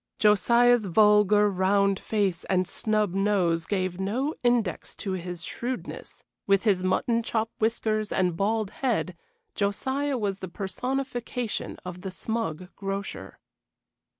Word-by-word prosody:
Josiah's 235 +2 +4
vulgar, 210 +1 +5
round 195 +1 +2
face 200 -5 -1
and 185 -1 +1
snub 215 -3 0
nose 185 -4 +1
gave 185 -2 -1
no 245 +10 -1
index 240 -8 0
to 195 - -4
his 175 -2 -4
shrewdness; 245 +7 -6 0.2
with 195 -1 +3
his 195 -5 +2
mutton 230 +5 +1
chop 225 0 -1
whiskers 215 -1 0
and 180 -2 +1
bald 210 +2 0
head, 225 -9 -1 0.4
Josiah 265 +7 -1
was 200 -4 -2
the 185 - -6
personification 245 +4 -3
of 180 0 -7
the 190 - -4
smug 185 -4 -3
grocer. 195 - -5
205 Hz, 125 wpm, -27 LUFS, 185-225 Hz, 0.4 s, vulgar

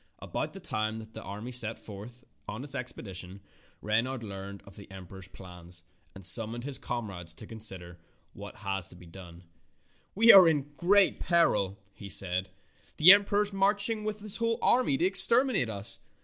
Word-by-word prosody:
About - - -5
the - - -10
time 110 +1 -3
that 110 0 -11
the - - -9
army 105 +6 -8
set 115 -2 0
forth 110 +4 -12 0.2
on 110 +5 -7
its 140 -2 -7
expedition 100 -8 -7 0.4
Reynard 115 +4 -1
learned 100 -1 -9
of 100 - -16
the 100 - -14
em 95 -1 -11
peror's 95 +1 -13
plans 90 -2 -11 0.3
and 95 -2 -9
summoned 115 +3 +2
his 140 0 -5
comrades 100 -9 -6
to - - -12
consider 95 -6 -8 0.3
what - - -12
was 95 -2 -4
to - - -16
be 90 0 -15
done. 85 0 -13 0.7
"We 225 +4 +7
are 185 -3 +9
in 145 -2 -1
great 195 +6 +2
peril," 165 - +1 0.2
he 100 - -11
said. 95 -1 0 0.5
"The 170 +4 +9
emperor 205 +1 +4
is 205 -1 -9
marching 205 +3 0
with 210 0 -5
his 210 -1 -3
whole 230 0 -1
army 245 - +2
to 170 - 0
exterminate 195 - +5
us. 100 -1 -1
110 Hz, 175 wpm, -28 LUFS, -, 0.7 s, are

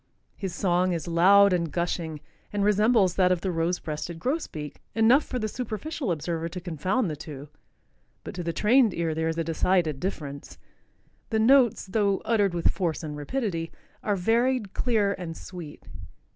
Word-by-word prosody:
His 190 -4 -5
song 180 -1 +1
is 165 -1 -4
loud 190 +4 +6
and 170 -3 0
gushing 165 -2 -2 0.3
and 205 -1 -1
resembles 210 -2 +3
that 185 -1 +4
of 180 -2 +1
the 190 - -1
rose 170 +1 0
breasted 155 +2 -5
grosbeak 165 - -4
enough 235 +6 +5
for 255 - -4
the 215 -3 -1
superficial 250 - -4
observer 165 +1 -2
to 180 +2 -6
confound 185 - -1
the 155 - -3
two, 145 -1 -9 0.7
but - - -7
to 180 - -5
the 170 -1 -2
trained 220 +3 +3
ear 165 -2 -1
there 160 +1 -1
is 165 - -3
a 165 - 0
decided 165 -2 +1
difference. 145 -6 -5 0.7
The 220 - 0
notes, 245 +1 +4
though 200 0 +1
uttered 205 -6 +2
with 170 - +2
force 170 -4 -2
and 150 -1 -5
rapidity, 165 - -3 0.3
are 205 - 0
varied, 225 +2 +1
clear 215 -5 +1
and 165 -3 -6
sweet. 170 -5 -9
180 Hz, 170 wpm, -26 LUFS, 165-215 Hz, 0.7 s, loud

